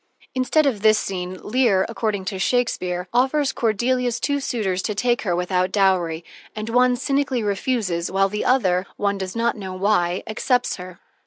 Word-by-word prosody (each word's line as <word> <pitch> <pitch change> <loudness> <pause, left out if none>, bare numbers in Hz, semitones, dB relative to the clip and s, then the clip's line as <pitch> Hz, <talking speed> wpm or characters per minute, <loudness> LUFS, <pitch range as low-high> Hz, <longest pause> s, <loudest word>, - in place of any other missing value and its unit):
Instead 265 +4 +2
of 240 -8 0
this 215 0 +5
scene, 185 -2 -4
Lear, 215 -5 +2
according 215 -4 -2
to 190 0 -4
Shakespeare, 180 -5 0
offers 270 +3 +2
Cordelia's 240 +2 0
two 285 +2 0
suitors 205 -9 -1
to 210 - -3
take 240 +2 +1
her 180 -5 0
without 180 +1 0
dowry, 180 -5 +1 0.3
and 215 +1 -4
one 250 +1 +3
cynically 275 -1 0
refuses, 200 -4 -1
while 195 +1 +2
the 210 +2 -3
other, 190 -8 +2
one 200 -1 0
does 190 +1 -5
not 235 +1 +1
know 190 -4 -6
why, 185 -2 +1
accepts 245 +3 0
her. 180 -1 -10
210 Hz, 165 wpm, -22 LUFS, 185-245 Hz, 0.3 s, this